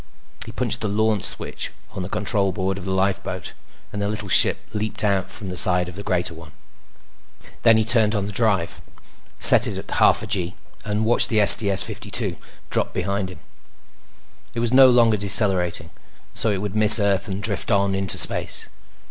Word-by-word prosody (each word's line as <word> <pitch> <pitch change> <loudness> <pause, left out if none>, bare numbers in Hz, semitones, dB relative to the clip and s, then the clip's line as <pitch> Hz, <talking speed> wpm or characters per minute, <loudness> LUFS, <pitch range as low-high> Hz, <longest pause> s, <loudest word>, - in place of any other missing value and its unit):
He - - -8
punched - - -2
the 110 - -3
LAUNCH 105 -1 -1
switch - - -4 0.2
on - - -8
the 90 - -7
control 100 -2 -2
board 95 +1 -4
of 95 - -11
the 95 - -4
lifeboat, 95 0 -3 0.4
and 105 - -5
the 100 - -2
little 105 -1 -5
ship - - +4
leaped 110 0 -5
out 100 -3 -1
from 100 - -6
the 90 - -7
side 90 0 +1
of 90 - -10
the 100 - -8
greater 90 -4 -3
one. 85 -1 -15 1.1
Then 115 -1 +4
he 110 - -1
turned 115 -2 +1
on 100 -1 -3
the 105 - -7
drive, 100 -5 -2 0.6
set - - +8
it - - -5
at - - -10
half - - +2
a - - -5
gee, 90 -1 -3 0.3
and 105 0 -3
watched 120 +2 +1
the 110 -3 +2
STS 100 -2 +6
52 - - -4 0.3
drop - - -3
behind 95 +1 -3
him. 90 - -14 1.1
It - - -4
was 120 +1 -2
no 130 0 +6
longer 115 -3 +2
decelerating, 95 -5 +2 0.4
so 115 - 0
it 100 -1 -3
would 105 0 -6
miss 110 0 +7
Earth 100 0 -1
and 100 0 -7
drift 100 -3 -5
on 100 -2 0
into 95 -1 0
space. - - +3
100 Hz, 190 wpm, -20 LUFS, 95-110 Hz, 1.1 s, set